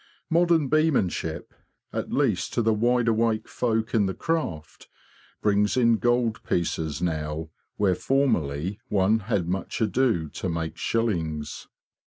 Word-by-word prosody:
Modern 170 Hz, -3 st, +3 dB
beemanship, 130 Hz, -, 0 dB, 0.4 s
at -, -, -3 dB
least -, -, 0 dB
to 120 Hz, -, +2 dB
the 110 Hz, 0 st, +3 dB
wide 120 Hz, +2 st, +2 dB
awake 115 Hz, -1 st, +1 dB
folk 115 Hz, -2 st, -1 dB
in 105 Hz, -4 st, +3 dB
the 95 Hz, -, -3 dB
craft, 95 Hz, -, -3 dB, 0.6 s
brings 105 Hz, +2 st, +2 dB
in 115 Hz, -2 st, +4 dB
gold 120 Hz, -1 st, +1 dB
pieces 80 Hz, -2 st, -2 dB
now 80 Hz, -1 st, -2 dB, 0.3 s
where 100 Hz, -3 st, +3 dB
formerly 95 Hz, -, 0 dB
one 105 Hz, +2 st, +3 dB
had 100 Hz, -5 st, -1 dB
much 95 Hz, +2 st, -3 dB
ado 110 Hz, -6 st, +1 dB
to 95 Hz, -, -4 dB
make 80 Hz, -1 st, -3 dB
shillings. 85 Hz, -10 st, -2 dB
105 Hz, 130 wpm, -25 LUFS, 85-120 Hz, 0.6 s, in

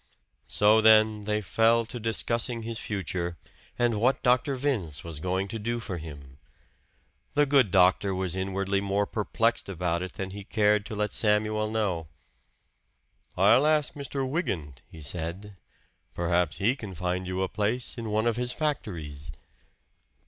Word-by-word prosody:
So 105 Hz, +2 st, +4 dB
then 110 Hz, -1 st, +5 dB
they 105 Hz, 0 st, 0 dB
fell 115 Hz, +4 st, +3 dB
to 120 Hz, +2 st, -7 dB
discussing 115 Hz, +1 st, -1 dB
his 115 Hz, -1 st, -4 dB
future, 90 Hz, -4 st, -3 dB, 0.4 s
and 120 Hz, -3 st, +1 dB
what 130 Hz, +3 st, +2 dB
Dr. 125 Hz, +2 st, +3 dB
Vince 120 Hz, -, -2 dB
was 80 Hz, -3 st, -6 dB
going 95 Hz, +3 st, -1 dB
to 115 Hz, -, -4 dB
do 120 Hz, +3 st, -2 dB
for 95 Hz, -6 st, -5 dB
him. 70 Hz, -4 st, -11 dB, 1.0 s
The 145 Hz, 0 st, +5 dB
good 135 Hz, -6 st, +4 dB
doctor 95 Hz, +1 st, +3 dB
was 95 Hz, -1 st, -2 dB
inwardly 95 Hz, +1 st, -1 dB
more 100 Hz, +1 st, 0 dB
perplexed 115 Hz, +1 st, -1 dB
about 90 Hz, -2 st, -1 dB
it 95 Hz, -1 st, -5 dB
than 95 Hz, -1 st, -5 dB
he 100 Hz, +1 st, -7 dB
cared 105 Hz, 0 st, +2 dB
to 110 Hz, -, -6 dB
let 105 Hz, 0 st, -1 dB
Samuel 110 Hz, 0 st, +2 dB
know. 100 Hz, -8 st, -1 dB, 1.3 s
"I'll 145 Hz, +4 st, +5 dB
ask 155 Hz, -2 st, +2 dB
Mr. 140 Hz, -1 st, -3 dB
Wygant," 90 Hz, -, -3 dB
he 80 Hz, -, -12 dB
said 85 Hz, +6 st, -5 dB, 0.6 s
"perhaps 85 Hz, -2 st, +1 dB
he 115 Hz, +6 st, +2 dB
can 105 Hz, -8 st, -8 dB
find 90 Hz, +2 st, -2 dB
you 95 Hz, +1 st, -1 dB
a -, -, 0 dB
place 110 Hz, +5 st, -2 dB
in 115 Hz, -3 st, -5 dB
one 110 Hz, +1 st, +1 dB
of 120 Hz, -1 st, +1 dB
his 125 Hz, 0 st, +1 dB
factories." 80 Hz, -, -3 dB
105 Hz, 155 wpm, -27 LUFS, 90-115 Hz, 1.3 s, then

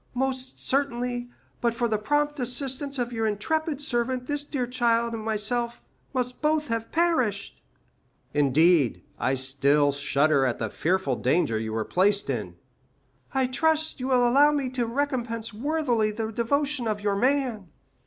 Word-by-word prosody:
Most 260 Hz, 0 st, -2 dB
certainly, 245 Hz, -3 st, -1 dB, 0.3 s
but 235 Hz, -1 st, +1 dB
for 235 Hz, 0 st, 0 dB
the 215 Hz, -2 st, 0 dB
prompt 295 Hz, +5 st, 0 dB
assistance 265 Hz, +3 st, -2 dB
of 245 Hz, -1 st, -2 dB
your 225 Hz, -1 st, 0 dB
intrepid 295 Hz, +8 st, -1 dB
servant, 250 Hz, -3 st, -1 dB
this 290 Hz, +1 st, -1 dB
dear 280 Hz, -4 st, -2 dB
child 235 Hz, -1 st, +1 dB
and 225 Hz, -1 st, -4 dB
myself 235 Hz, +2 st, -2 dB, 0.3 s
must 250 Hz, -2 st, -2 dB
both 305 Hz, 0 st, +1 dB
have 230 Hz, 0 st, -3 dB
perished." 260 Hz, -, 0 dB, 0.7 s
"Indeed, 145 Hz, 0 st, +3 dB, 0.2 s
I 130 Hz, -, +1 dB
still 140 Hz, +2 st, +2 dB
shudder 140 Hz, 0 st, +2 dB
at 125 Hz, -3 st, 0 dB
the 110 Hz, -3 st, -3 dB
fearful 170 Hz, -7 st, 0 dB
danger 125 Hz, -5 st, +1 dB
you 110 Hz, 0 st, -4 dB
were 110 Hz, 0 st, -2 dB
placed 200 Hz, +2 st, +1 dB
in." -, -, -4 dB, 0.8 s
"I 265 Hz, -1 st, +1 dB
trust 315 Hz, +4 st, +1 dB
you 255 Hz, -, -3 dB
will 250 Hz, -2 st, +4 dB
allow 285 Hz, +5 st, +5 dB
me 280 Hz, -4 st, -1 dB
to 245 Hz, -2 st, -1 dB
recompense 235 Hz, -4 st, -2 dB
worthily 245 Hz, -3 st, 0 dB
the 220 Hz, +1 st, -3 dB
devotion 275 Hz, +3 st, 0 dB
of 210 Hz, -1 st, -2 dB
your 205 Hz, -1 st, 0 dB
man." 250 Hz, -3 st, 0 dB
240 Hz, 155 wpm, -26 LUFS, 205-270 Hz, 0.8 s, allow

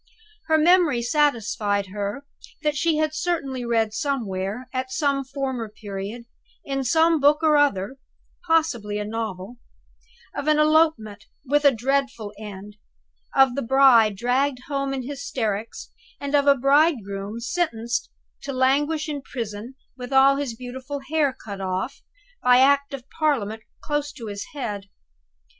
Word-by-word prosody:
Her 315 Hz, 0 st, +4 dB
memory 315 Hz, -6 st, +4 dB
satisfied 225 Hz, -7 st, +1 dB
her 205 Hz, +7 st, -4 dB, 0.4 s
that 300 Hz, -1 st, +1 dB
she 320 Hz, +2 st, +1 dB
had 310 Hz, 0 st, 0 dB
certainly 310 Hz, -6 st, -2 dB
read 225 Hz, -2 st, 0 dB
somewhere, 225 Hz, -5 st, -3 dB
at 260 Hz, 0 st, -3 dB
some 280 Hz, 0 st, 0 dB
former 265 Hz, -4 st, -4 dB
period, 205 Hz, +2 st, -7 dB, 0.4 s
in 270 Hz, -1 st, -2 dB
some 320 Hz, +5 st, +3 dB
book 295 Hz, +3 st, +4 dB
or 310 Hz, -1 st, +5 dB
other 270 Hz, -5 st, +1 dB, 0.5 s
(possibly 245 Hz, -11 st, +1 dB
a 210 Hz, -, -3 dB
novel), 215 Hz, 0 st, -5 dB, 0.8 s
of 285 Hz, -, -4 dB
an 305 Hz, 0 st, +4 dB
elopement 305 Hz, -9 st, +2 dB, 0.2 s
with 290 Hz, +2 st, +1 dB
a 280 Hz, -, +8 dB
dreadful 260 Hz, -3 st, -1 dB
end 205 Hz, 0 st, -9 dB, 0.6 s
of 270 Hz, -1 st, +6 dB
a 280 Hz, -, -1 dB
bride 240 Hz, -4 st, +5 dB
dragged 250 Hz, +4 st, 0 dB
home 275 Hz, -1 st, -2 dB
in 260 Hz, -2 st, -4 dB
hysterics 230 Hz, -6 st, -4 dB, 0.3 s
and 280 Hz, 0 st, -5 dB
of 285 Hz, -1 st, +3 dB
a 280 Hz, -, +7 dB
bridegroom 235 Hz, -, +1 dB
sentenced 235 Hz, -5 st, -2 dB, 0.3 s
to 280 Hz, -, -5 dB
languish 290 Hz, +4 st, +1 dB
in 290 Hz, -2 st, -4 dB
prison, 230 Hz, -1 st, -6 dB, 0.2 s
with 250 Hz, 0 st, -8 dB
all 270 Hz, +1 st, +5 dB
his 275 Hz, -5 st, -3 dB
beautiful 260 Hz, +4 st, -7 dB
hair 305 Hz, -3 st, +2 dB
cut 205 Hz, -6 st, -9 dB
off, 190 Hz, +7 st, -3 dB, 0.4 s
by 250 Hz, 0 st, +5 dB
Act 280 Hz, +2 st, +3 dB
of 260 Hz, -1 st, -12 dB
Parliament, 225 Hz, -9 st, 0 dB, 0.2 s
close 295 Hz, -1 st, -2 dB
to 235 Hz, -, -9 dB
his 205 Hz, -1 st, -5 dB
head. 205 Hz, -7 st, -5 dB
260 Hz, 140 wpm, -24 LUFS, 220-285 Hz, 0.8 s, a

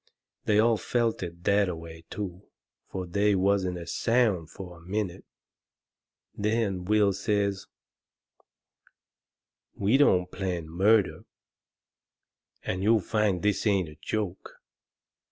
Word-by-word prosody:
They 105 Hz, -, +3 dB
all 115 Hz, +1 st, +4 dB
felt 115 Hz, +1 st, 0 dB
it 85 Hz, -1 st, -7 dB
that 100 Hz, -1 st, +3 dB
a 90 Hz, -, -3 dB
way, 80 Hz, 0 st, -10 dB
too; 95 Hz, -2 st, -6 dB, 0.4 s
fur 95 Hz, -1 st, -3 dB
they 100 Hz, +3 st, +2 dB
wasn't 95 Hz, -1 st, +1 dB
a 85 Hz, -, -7 dB
sound 105 Hz, -3 st, +1 dB
fur 90 Hz, -2 st, -9 dB
a -, -, -16 dB
minute. 95 Hz, +1 st, -3 dB, 1.1 s
Then 105 Hz, -4 st, 0 dB
Will 105 Hz, 0 st, +3 dB
says: 100 Hz, -1 st, -1 dB, 2.1 s
"We 105 Hz, +6 st, +3 dB
don't 90 Hz, -11 st, +3 dB
plan 90 Hz, -4 st, -3 dB
murder, 100 Hz, +5 st, +2 dB, 1.4 s
and 95 Hz, -, -2 dB
you'll 110 Hz, +2 st, +4 dB
find 105 Hz, -2 st, 0 dB
this 105 Hz, +1 st, +1 dB
ain't 95 Hz, -5 st, +2 dB
a 75 Hz, -, -14 dB
joke. 105 Hz, -4 st, -3 dB
100 Hz, 120 wpm, -28 LUFS, 90-105 Hz, 2.1 s, all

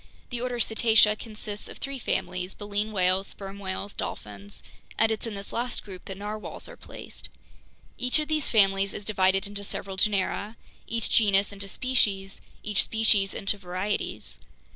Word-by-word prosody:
The 240 Hz, -1 st, -2 dB
order 250 Hz, -1 st, -1 dB
Cetacea 220 Hz, -1 st, +5 dB
consists 210 Hz, -2 st, -6 dB
of -, -, -9 dB
three 275 Hz, -1 st, -4 dB
families, 180 Hz, -4 st, -1 dB
baleen 205 Hz, +1 st, -2 dB
whales, 185 Hz, -1 st, +3 dB
sperm 195 Hz, 0 st, -7 dB
whales, 195 Hz, +1 st, -4 dB
dolphins, 100 Hz, -1 st, -6 dB, 0.3 s
and 225 Hz, 0 st, +4 dB
it's 220 Hz, +1 st, -2 dB
in 220 Hz, -, -4 dB
this 200 Hz, 0 st, -5 dB
last 240 Hz, +1 st, -2 dB
group 185 Hz, -3 st, -10 dB
that 195 Hz, -, -6 dB
narwhales 210 Hz, +1 st, -5 dB
are -, -, -10 dB
placed. -, -, -10 dB, 0.7 s
Each 250 Hz, +3 st, +3 dB
of 305 Hz, -1 st, 0 dB
these 310 Hz, -1 st, +1 dB
families 195 Hz, -2 st, +4 dB
is 205 Hz, -, -6 dB
divided 190 Hz, -2 st, +3 dB
into 200 Hz, 0 st, -4 dB
several 195 Hz, -1 st, -5 dB
genera, 205 Hz, +2 st, +1 dB, 0.3 s
each 230 Hz, 0 st, -1 dB
genus 200 Hz, -2 st, +5 dB
into 200 Hz, 0 st, -6 dB
species, 195 Hz, -5 st, 0 dB, 0.2 s
each 210 Hz, -1 st, +2 dB
species 215 Hz, -3 st, +2 dB
into 200 Hz, +1 st, 0 dB
varieties. 185 Hz, +2 st, -3 dB
205 Hz, 160 wpm, -28 LUFS, 195-220 Hz, 0.7 s, Cetacea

